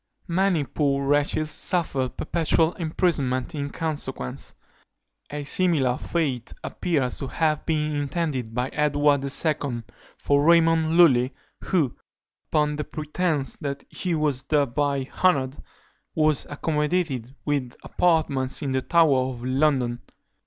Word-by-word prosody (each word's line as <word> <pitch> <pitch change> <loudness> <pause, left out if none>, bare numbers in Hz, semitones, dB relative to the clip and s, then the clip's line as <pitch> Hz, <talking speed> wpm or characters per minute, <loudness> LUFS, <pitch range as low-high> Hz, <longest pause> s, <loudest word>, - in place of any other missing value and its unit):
Many 175 -2 +2
poor 140 -1 0
wretches 145 +2 +1
suffered 145 -7 0
perpetual 165 0 +1
imprisonment 155 -5 -1
in 145 -2 -3
consequence. 145 - -4 0.7
A 145 0 -5
similar 140 -5 +1
fate 135 -8 -2
appears 140 -8 -1
to 135 - -4
have 155 +3 0
been 150 -1 0
intended 145 -5 -2
by 125 +1 -1
Edward 145 -1 +2
II. 140 -4 0 0.3
for 145 0 +2
Raymond 165 0 +4
Lulli, 130 -7 +5 0.3
who, 160 -10 +1 0.5
upon 150 -1 +1
the 150 - -2
pretence 155 -1 -2
that 140 -1 -5
he 180 -3 -2
was 150 -4 +1
thereby 140 -1 0 0.2
honoured, 140 -6 +3 0.6
was 155 -3 +2
accommodated 150 -4 -1
with 140 -5 -1
apartments 155 -6 +1
in 140 - -2
the 130 0 0
Tower 140 -5 +3
of 120 -2 -7
London. 130 -3 +1
145 Hz, 115 wpm, -24 LUFS, 135-160 Hz, 0.7 s, Lulli